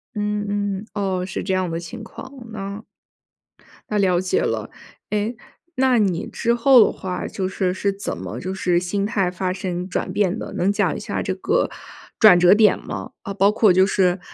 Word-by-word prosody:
嗯， 210 Hz, 0 st, -1 dB, 0.4 s
嗯， 220 Hz, -, -13 dB
哦， 190 Hz, -3 st, -1 dB
是 190 Hz, -, -5 dB
这 190 Hz, -, -1 dB
样 185 Hz, -1 st, 0 dB
的 165 Hz, 0 st, -3 dB
情 170 Hz, -2 st, -8 dB
况。 265 Hz, -, -10 dB, 0.2 s
那 200 Hz, 0 st, -6 dB, 1.1 s
那 210 Hz, -, 0 dB
了 185 Hz, -3 st, +2 dB
解 185 Hz, -, 0 dB
了。 -, -, -2 dB, 0.4 s
哎， 210 Hz, +2 st, -1 dB, 0.4 s
那 260 Hz, -2 st, +3 dB
你 195 Hz, -3 st, +1 dB
之 235 Hz, +1 st, 0 dB
后 240 Hz, -1 st, +6 dB
的 -, -, 0 dB
话 180 Hz, -1 st, -5 dB
就 190 Hz, -2 st, -3 dB
是， 185 Hz, -1 st, -1 dB
是 200 Hz, +1 st, 0 dB
怎 195 Hz, +1 st, -5 dB
么， -, -, -6 dB
就 185 Hz, +1 st, -4 dB
是 180 Hz, -2 st, +1 dB
心 195 Hz, +3 st, -2 dB
态 200 Hz, -4 st, 0 dB
发 180 Hz, 0 st, -2 dB
生 180 Hz, -1 st, -4 dB
转 -, -, -2 dB
变 205 Hz, 0 st, +1 dB
的， -, -, -7 dB
能 195 Hz, +3 st, +1 dB
讲 -, -, 0 dB
一 -, -, -5 dB
下 -, -, -3 dB
这 -, -, -1 dB
个 -, -, 0 dB, 0.5 s
转 200 Hz, -5 st, +8 dB
折 175 Hz, +1 st, +7 dB
点 215 Hz, 0 st, +5 dB
吗？ -, -, -7 dB
呃， 200 Hz, -, -5 dB
包 200 Hz, +1 st, +3 dB
括 210 Hz, -3 st, +4 dB
就 185 Hz, +1 st, +5 dB
是 185 Hz, -2 st, +2 dB
195 Hz, 210 characters per minute, -22 LUFS, 180-210 Hz, 1.1 s, 转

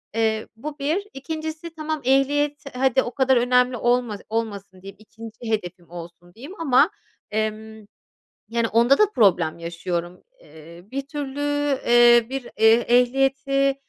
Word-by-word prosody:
eee, 220 Hz, -1 st, 0 dB
bu 295 Hz, +5 st, -8 dB
1. 320 Hz, +9 st, -1 dB
2'ncisi 315 Hz, +3 st, -6 dB
tamam 310 Hz, -1 st, -4 dB
ehliyet 285 Hz, +2 st, +1 dB
hadi 265 Hz, 0 st, +2 dB
o 240 Hz, -, -5 dB
kadar 265 Hz, -1 st, +3 dB
önemli 250 Hz, +1 st, +2 dB
olma 240 Hz, -2 st, 0 dB
olmasın 200 Hz, -4 st, -4 dB
diyeyim, 195 Hz, 0 st, -11 dB
2'nci 225 Hz, +1 st, -11 dB
hedefim 175 Hz, -5 st, -4 dB
olsun 175 Hz, +1 st, -11 dB
diyeyim 280 Hz, -, -11 dB
ama, 290 Hz, +1 st, +4 dB, 0.4 s
emm, 220 Hz, 0 st, -4 dB, 0.6 s
yani, 230 Hz, 0 st, -1 dB
onda 235 Hz, +5 st, +4 dB
da 425 Hz, -1 st, +4 dB
problem 175 Hz, -7 st, +2 dB
yaşıyorum. 170 Hz, +1 st, -5 dB, 0.2 s
Eee, 165 Hz, -, -15 dB
bir 275 Hz, +1 st, -5 dB
türlü, 285 Hz, -1 st, -6 dB, 0.5 s
eee, 240 Hz, -1 st, +6 dB
bir 270 Hz, -1 st, -4 dB
eh 225 Hz, +2 st, +4 dB
ehliyeti, 270 Hz, +2 st, +2 dB
240 Hz, 135 wpm, -23 LUFS, 215-275 Hz, 0.6 s, eee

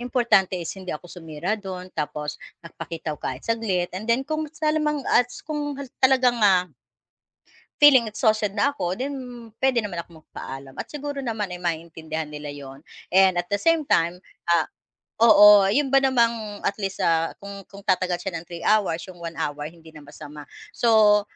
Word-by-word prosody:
importante 235 Hz, -7 st, +2 dB
is 170 Hz, -2 st, -5 dB
hindi 190 Hz, -2 st, -11 dB
ako 170 Hz, +3 st, -6 dB
sumira 165 Hz, +2 st, -4 dB
do'n 185 Hz, -2 st, -8 dB
tapos 150 Hz, -1 st, -4 dB, 0.2 s
nagpakita 165 Hz, -1 st, -6 dB
ko -, -, -5 dB
kahit 130 Hz, +1 st, -6 dB
saglit 210 Hz, -7 st, -1 dB
and 210 Hz, +5 st, -6 dB
then 250 Hz, +3 st, +2 dB
kung 310 Hz, 0 st, -3 dB
sa 305 Hz, 0 st, -1 dB
lamang 300 Hz, -3 st, -1 dB
at 245 Hz, 0 st, +4 dB, 0.2 s
kung 295 Hz, -2 st, -4 dB
ha 280 Hz, -, -6 dB, 0.2 s
talagang, 255 Hz, -3 st, +3 dB
ah 185 Hz, -4 st, +3 dB, 1.1 s
Feeling 275 Hz, -5 st, +8 dB
exhausted 215 Hz, -2 st, +1 dB
na 250 Hz, +7 st, +1 dB
ako 180 Hz, -8 st, -2 dB
then 280 Hz, +2 st, -3 dB, 0.5 s
puwede 260 Hz, -3 st, +3 dB
naman 175 Hz, -4 st, -4 dB
ako 165 Hz, -2 st, -17 dB
magpaalam 135 Hz, 0 st, -9 dB
at -, -, -5 dB
siguro 290 Hz, -1 st, -5 dB
naman 220 Hz, -4 st, -2 dB
ay 180 Hz, 0 st, -7 dB
maiintindihan 160 Hz, -2 st, -4 dB
nila 150 Hz, -1 st, -7 dB
'yun 135 Hz, -2 st, -10 dB, 0.3 s
and 190 Hz, -1 st, +5 dB
at 175 Hz, -, -10 dB
the 205 Hz, -, +1 dB
same 330 Hz, -2 st, +2 dB
time 170 Hz, +2 st, +2 dB, 0.3 s
ah, 165 Hz, -2 st, +3 dB, 0.6 s
oo 210 Hz, -3 st, +8 dB
'yun 280 Hz, +4 st, +2 dB
ba 275 Hz, +1 st, +5 dB
namang 230 Hz, -5 st, +1 dB
at -, -, 0 dB
least, 195 Hz, -1 st, -3 dB
ah, 165 Hz, 0 st, +1 dB
kung 200 Hz, 0 st, -9 dB
kung 200 Hz, -, -11 dB
tatagal 185 Hz, -2 st, +1 dB
siya 190 Hz, -3 st, -5 dB
ng 165 Hz, -, -11 dB
3 170 Hz, -1 st, -8 dB
hours 200 Hz, -6 st, +2 dB
yung 180 Hz, -2 st, -11 dB
1 165 Hz, -1 st, -6 dB
hour 145 Hz, 0 st, -3 dB
hindi 165 Hz, -1 st, -16 dB
na 150 Hz, -1 st, -12 dB
masama. 150 Hz, 0 st, -11 dB, 0.3 s
So 215 Hz, -3 st, +5 dB
195 Hz, 180 wpm, -24 LUFS, 165-240 Hz, 1.1 s, Feeling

